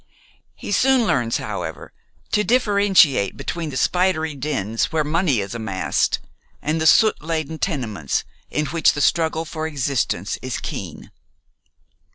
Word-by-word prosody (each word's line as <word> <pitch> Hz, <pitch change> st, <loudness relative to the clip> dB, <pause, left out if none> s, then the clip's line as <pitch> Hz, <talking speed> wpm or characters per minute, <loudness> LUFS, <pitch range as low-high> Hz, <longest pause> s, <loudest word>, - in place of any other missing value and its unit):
He -, -, -7 dB
soon 255 Hz, +3 st, +3 dB
learns, 120 Hz, -, +1 dB
however, 90 Hz, -7 st, -6 dB, 0.4 s
to 210 Hz, -, +2 dB
differentiate 200 Hz, -, +3 dB
between 170 Hz, -2 st, -4 dB
the 130 Hz, -, -5 dB
spidery 175 Hz, -1 st, +1 dB
dens 120 Hz, -6 st, -1 dB
where 155 Hz, -1 st, +1 dB
money 150 Hz, -, +1 dB
is 100 Hz, +2 st, -5 dB
amassed 110 Hz, -5 st, 0 dB, 0.4 s
and 155 Hz, +2 st, -1 dB
the 160 Hz, -, +3 dB
soot 220 Hz, +6 st, +5 dB
laden 160 Hz, 0 st, -3 dB
tenements 115 Hz, -, -2 dB, 0.3 s
in 150 Hz, -, -1 dB
which 160 Hz, +3 st, +2 dB
the 145 Hz, -, -4 dB
struggle 160 Hz, 0 st, +1 dB
for 160 Hz, 0 st, -4 dB
existence 135 Hz, -, -1 dB
is 130 Hz, -1 st, -3 dB
keen. -, -, -7 dB
155 Hz, 135 wpm, -21 LUFS, 120-170 Hz, 0.4 s, soot